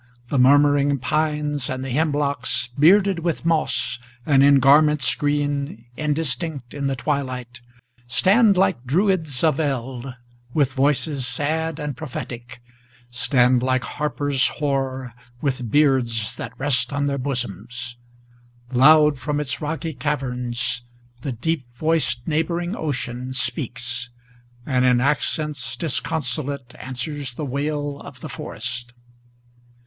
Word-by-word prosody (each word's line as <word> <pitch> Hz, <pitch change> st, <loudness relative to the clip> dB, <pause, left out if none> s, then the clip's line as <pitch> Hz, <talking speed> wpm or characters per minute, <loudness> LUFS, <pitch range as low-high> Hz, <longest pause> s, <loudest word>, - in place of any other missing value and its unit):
The 140 Hz, -, +1 dB
murmuring 145 Hz, +1 st, +5 dB
pines 150 Hz, +1 st, -1 dB
and 130 Hz, 0 st, -3 dB
the 135 Hz, -, -4 dB
hemlocks, 145 Hz, -4 st, 0 dB
Bearded 190 Hz, +4 st, +5 dB
with 170 Hz, -1 st, -2 dB
moss, 160 Hz, -6 st, +1 dB, 0.3 s
and 140 Hz, -3 st, +4 dB
in 140 Hz, 0 st, +7 dB
garments 145 Hz, 0 st, +5 dB
green, 145 Hz, -5 st, -1 dB
indistinct 150 Hz, -3 st, -2 dB
in 140 Hz, -1 st, -2 dB
the 135 Hz, -, -1 dB
twilight, 125 Hz, -3 st, -3 dB, 0.5 s
Stand 200 Hz, -, +4 dB
like 180 Hz, -10 st, +2 dB
Druids 160 Hz, -1 st, +1 dB
of 155 Hz, -3 st, +3 dB
eld, 130 Hz, -3 st, -3 dB, 0.4 s
with 140 Hz, -4 st, +2 dB
voices 140 Hz, -1 st, 0 dB
sad 155 Hz, +6 st, -1 dB
and 150 Hz, -3 st, -4 dB
prophetic, 125 Hz, -3 st, -7 dB, 0.5 s
Stand 125 Hz, 0 st, +3 dB
like 130 Hz, 0 st, +1 dB
harpers 145 Hz, -2 st, 0 dB
hoar, 135 Hz, -4 st, -2 dB, 0.3 s
with 130 Hz, -4 st, -2 dB
beards 125 Hz, -5 st, +2 dB
that -, -, -7 dB
rest 135 Hz, -1 st, +2 dB
on 145 Hz, 0 st, 0 dB
their 140 Hz, -1 st, -1 dB
bosoms. 125 Hz, -2 st, -4 dB, 0.8 s
Loud 150 Hz, +2 st, +6 dB
from 145 Hz, +3 st, -2 dB
its 135 Hz, -5 st, -2 dB
rocky 160 Hz, +2 st, -3 dB
caverns, 125 Hz, -3 st, -2 dB, 0.4 s
the 140 Hz, -, -3 dB
deep 130 Hz, +2 st, -2 dB
voiced 130 Hz, -4 st, 0 dB
neighboring 170 Hz, +4 st, -1 dB
ocean 130 Hz, -, -4 dB
Speaks, 120 Hz, -2 st, -1 dB, 0.6 s
and 130 Hz, -3 st, +1 dB
in 125 Hz, -1 st, +4 dB
accents 150 Hz, +1 st, -1 dB
disconsolate 140 Hz, -4 st, -2 dB
answers 135 Hz, +1 st, -3 dB
the 150 Hz, -, -4 dB
wail 145 Hz, +1 st, -2 dB
of 125 Hz, -3 st, -11 dB
the 155 Hz, -, -6 dB
forest. 125 Hz, -1 st, -5 dB
140 Hz, 120 wpm, -22 LUFS, 125-150 Hz, 0.8 s, in